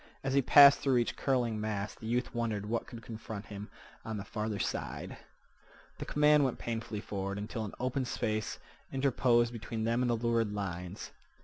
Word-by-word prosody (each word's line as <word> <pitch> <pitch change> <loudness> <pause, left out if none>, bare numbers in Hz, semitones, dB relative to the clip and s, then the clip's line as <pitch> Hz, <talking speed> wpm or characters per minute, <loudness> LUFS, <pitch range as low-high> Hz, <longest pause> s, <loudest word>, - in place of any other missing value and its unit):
As 135 -1 -1
he 140 - +5
passed 140 +2 +8
through 135 -3 +2
each 120 - 0
curling 120 -5 0
mass 105 -1 -2
the 110 - -9
youth 120 +2 -1
wondered 110 -4 -2
what 115 +2 -3
would 115 -2 -9
confront 110 -2 -7
him 100 +1 -7 0.3
on 110 -1 -4
the 100 - -6
farther 105 -1 -3
side. - - -3 0.8
The - - -4
command 150 0 +4
went 130 -3 0
painfully 115 -2 -4
forward 100 -1 -4
until 110 +2 -4
an 100 - -8
open 130 +1 -1
space 110 -3 -2 0.3
interposed 125 -3 +2
between 115 -1 -4
them 115 +2 +1
and 125 - +1
the 120 - +3
lurid 115 -2 0
lines. 90 -2 -5
115 Hz, 180 wpm, -32 LUFS, 105-125 Hz, 0.8 s, passed